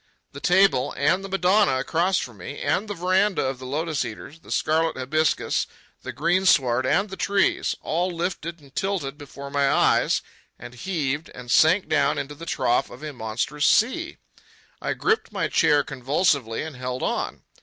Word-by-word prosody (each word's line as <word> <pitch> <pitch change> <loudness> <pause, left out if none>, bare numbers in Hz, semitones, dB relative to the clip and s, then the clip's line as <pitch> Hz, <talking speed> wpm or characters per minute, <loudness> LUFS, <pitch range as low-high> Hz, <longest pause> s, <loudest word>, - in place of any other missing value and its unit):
The 140 - -9
table, 175 -7 +3
and 165 +7 +2
the 195 - -7
Madonna 190 -4 +3
across 170 +8 +1
from 115 -4 -5
me, 100 +10 -8
and 205 +3 0
the 205 - -4
veranda 185 0 +1
of 130 -1 -3
the 130 - -8
lotus 155 +2 -1
eaters, 140 +8 -9
the - - -18
scarlet 160 0 +1
hibiscus, 150 +4 0 0.3
the - - -6
greensward 145 -7 +2
and 200 +8 +1
the - - -5
trees—all 190 -3 0
lifted 170 -1 -4
and 140 -2 -19
tilted 185 -8 -2
before 140 -1 -10
my 140 -1 +2
eyes, - - +3 0.3
and 120 +1 -10
heaved 150 0 -3
and 125 -1 -7
sank 165 +7 +4
down 150 0 +2
into 145 0 -4
the 165 +3 -10
trough 120 -6 +1
of 125 +5 -12
a 150 -1 -5
monstrous 125 +6 -1
sea. 345 +10 +2 0.6
I - - -1
gripped 445 0 0
my - - -1
chair 145 -1 +3
convulsively 135 -3 0
and 160 -3 -7
held 125 0 -4
on. - - -2
150 Hz, 165 wpm, -24 LUFS, 135-185 Hz, 0.6 s, sank